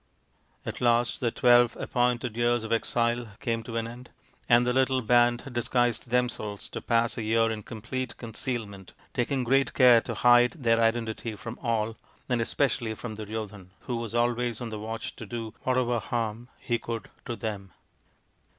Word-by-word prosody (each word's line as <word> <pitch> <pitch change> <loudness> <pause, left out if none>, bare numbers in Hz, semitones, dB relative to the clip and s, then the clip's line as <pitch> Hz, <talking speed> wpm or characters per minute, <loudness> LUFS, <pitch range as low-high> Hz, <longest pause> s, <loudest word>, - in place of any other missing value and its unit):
At - - -5
last 120 0 +2
the 120 - +1
twelve 120 0 +4
appointed 120 -1 0
years 120 0 +2
of 110 - -6
exile 120 +1 +1
came 115 -1 -1
to 115 0 -5
an 115 0 -1
end, 120 +2 -10 0.4
and 120 +1 +6
the 125 - +1
little 130 -1 +2
band 120 +1 +4
disguised 120 0 0
themselves 120 -4 -1
to - - -6
pass 115 0 +1
a - - -2
year 115 +1 +2
in 110 -1 -4
complete 125 +5 -5
concealment, 110 -4 -5 0.2
taking 130 +2 0
great 135 +3 +2
care 125 -3 +7
to - - -5
hide 120 0 +5
their 115 -7 +2
identity 115 -1 0
from 115 +3 -8
all, 115 -2 -1 0.3
and 120 -2 +1
especially 115 -2 0
from 115 0 -6
Duryodhan, 105 -3 -6
who 125 - -4
was 115 -1 -4
always 120 -1 +1
on 120 -3 -5
the 110 - -5
watch 110 +1 -5
to 110 - -8
do 115 0 -5
whatever 125 -2 +1
harm 115 +1 -3
he 120 -2 -1
could 115 -1 -6
to 120 - -3
them. 105 -4 -5
120 Hz, 170 wpm, -27 LUFS, 110-120 Hz, 0.4 s, care